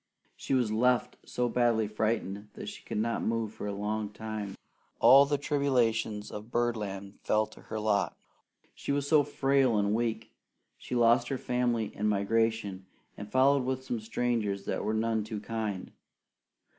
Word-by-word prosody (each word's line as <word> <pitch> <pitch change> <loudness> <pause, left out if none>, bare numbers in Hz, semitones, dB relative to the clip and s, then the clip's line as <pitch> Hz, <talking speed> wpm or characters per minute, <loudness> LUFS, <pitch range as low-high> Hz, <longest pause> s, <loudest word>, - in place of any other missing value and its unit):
She 135 - -1
was 120 -4 +1
left 125 +3 +2
so 125 0 0
badly 120 -2 +2
frightened 105 -1 -2
that - - -6
she - - -10
could - - -5
not 115 +2 0
move 115 -1 -1
for 105 - -6
a - - -2
long 105 +1 -2
time. 105 -2 -5 0.4
All 140 +1 +8
the 145 0 +1
tribulations 120 -7 0
of 105 +2 -8
birdland 105 -5 -2
fell 110 0 +2
to - - -16
her 110 - -5
lot. 105 -1 0 0.6
She - - -4
was 140 0 0
so 155 0 +6
frail 135 -4 +2
and 100 0 +1
weak 115 -1 -1 0.4
she - - -6
lost 120 0 +4
her 135 - -2
family 120 -4 -1
in 105 - -1
migration, 105 -2 0 0.3
and 105 0 -9
followed 135 +1 +4
with 130 0 -2
some 120 -3 -3
strangers 110 -3 -1
that - - -2
were 110 - 0
none 110 0 0
too 110 0 -5
kind. 105 -3 -4
110 Hz, 165 wpm, -30 LUFS, 105-125 Hz, 0.6 s, All